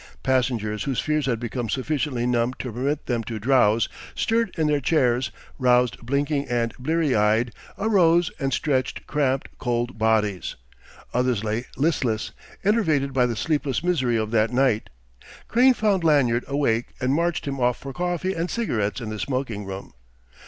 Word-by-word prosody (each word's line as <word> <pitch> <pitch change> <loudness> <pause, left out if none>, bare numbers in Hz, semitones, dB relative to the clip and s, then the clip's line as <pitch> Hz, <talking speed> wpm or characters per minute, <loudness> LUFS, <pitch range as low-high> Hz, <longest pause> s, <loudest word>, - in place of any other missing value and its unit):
Passengers 120 -5 0
whose 135 -3 -1
fears 150 -2 0
had 115 -4 0
become 120 0 -3
sufficiently 130 -1 -1
numb 120 0 +1
to 125 - -5
permit 140 +5 -2
them 120 -2 -1
to 115 - -4
drowse, 115 -1 +3 0.3
stirred 225 -1 +1
in 160 - +1
their 150 -1 +2
chairs, 125 -3 +2 0.3
roused 125 -5 +3
blinking 140 +3 0
and 115 -2 0
blear 155 +1 +1
eyed, 110 +3 +2 0.2
arose 175 -5 +3
and 135 -2 -1
stretched 130 -1 -1
cramped, 135 -3 0
cold 120 -1 -2
bodies. 110 -4 +1 0.6
Others 125 -3 +1
lay 110 +3 -2
listless, 135 -7 0 0.3
enervated 160 -10 +2
by 125 -1 +3
the 120 - -2
sleepless 145 +3 -1
misery 130 -10 +1
of 110 -1 -2
that 115 0 +2
night. 125 -4 +1 0.6
Crane 250 +2 +5
found 205 -6 +1
Lanyard 130 -7 +3
awake 140 -5 0
and 130 +1 +1
marched 170 +2 0
him 135 -1 -3
off 125 -1 +2
for 135 -1 -8
coffee 180 +2 -1
and 170 +1 -2
cigarettes 115 - -1
in 110 - -5
the 110 -1 -5
smoking 125 -6 -3
room. 95 -4 -7
130 Hz, 160 wpm, -24 LUFS, 115-150 Hz, 0.6 s, Crane